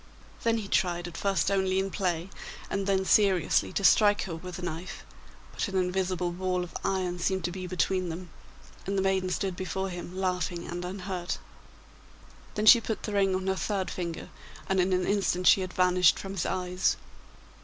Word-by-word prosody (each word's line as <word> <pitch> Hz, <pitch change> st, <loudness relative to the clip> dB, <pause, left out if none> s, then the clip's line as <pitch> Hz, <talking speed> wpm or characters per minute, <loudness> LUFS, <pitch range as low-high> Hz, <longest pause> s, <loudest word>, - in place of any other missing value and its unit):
Then 230 Hz, 0 st, +2 dB
he 215 Hz, -3 st, -4 dB
tried, 175 Hz, -3 st, 0 dB
at 175 Hz, -, -9 dB
first 195 Hz, -3 st, +1 dB
only 190 Hz, -1 st, +1 dB
in 195 Hz, 0 st, 0 dB
play, 180 Hz, -1 st, -2 dB, 0.4 s
and 195 Hz, 0 st, -1 dB
then 190 Hz, -1 st, +2 dB
seriously, 190 Hz, -5 st, +3 dB
to 200 Hz, -, -1 dB
strike 205 Hz, +3 st, +5 dB
her 175 Hz, -4 st, -5 dB
with 180 Hz, +2 st, -8 dB
the 180 Hz, -, -7 dB
knife, 175 Hz, +3 st, -6 dB, 0.5 s
but -, -, -2 dB
an 195 Hz, -, -6 dB
invisible 180 Hz, -1 st, 0 dB
wall 180 Hz, 0 st, -1 dB
of 180 Hz, -, -10 dB
iron 185 Hz, -2 st, -1 dB
seemed 190 Hz, +1 st, 0 dB
to 175 Hz, -, -1 dB
be 185 Hz, 0 st, -6 dB
between 185 Hz, 0 st, 0 dB
them, 170 Hz, +1 st, -7 dB, 0.6 s
and 195 Hz, 0 st, -1 dB
the -, -, +2 dB
maiden 190 Hz, -1 st, +1 dB
stood 185 Hz, 0 st, -2 dB
before 190 Hz, +1 st, -3 dB
him 175 Hz, 0 st, -7 dB
laughing 180 Hz, -2 st, -1 dB
and 175 Hz, +1 st, -5 dB
unhurt. 180 Hz, -1 st, -4 dB, 1.2 s
Then 210 Hz, -, 0 dB
she 235 Hz, +2 st, +9 dB
put 220 Hz, -1 st, -4 dB
the 210 Hz, -, -4 dB
ring 195 Hz, -2 st, +2 dB
on 185 Hz, 0 st, -3 dB
her 190 Hz, 0 st, +1 dB
third 195 Hz, -1 st, -2 dB
finger, 170 Hz, -2 st, -5 dB, 0.4 s
and 190 Hz, 0 st, +1 dB
in 185 Hz, +1 st, +2 dB
an 180 Hz, -1 st, +1 dB
instant 195 Hz, -3 st, 0 dB
she 195 Hz, -, +7 dB
had 185 Hz, -1 st, -4 dB
vanished 180 Hz, -2 st, +4 dB
from 195 Hz, -, -6 dB
his 185 Hz, -4 st, -2 dB
eyes. 180 Hz, 0 st, 0 dB
185 Hz, 190 wpm, -28 LUFS, 180-195 Hz, 1.2 s, she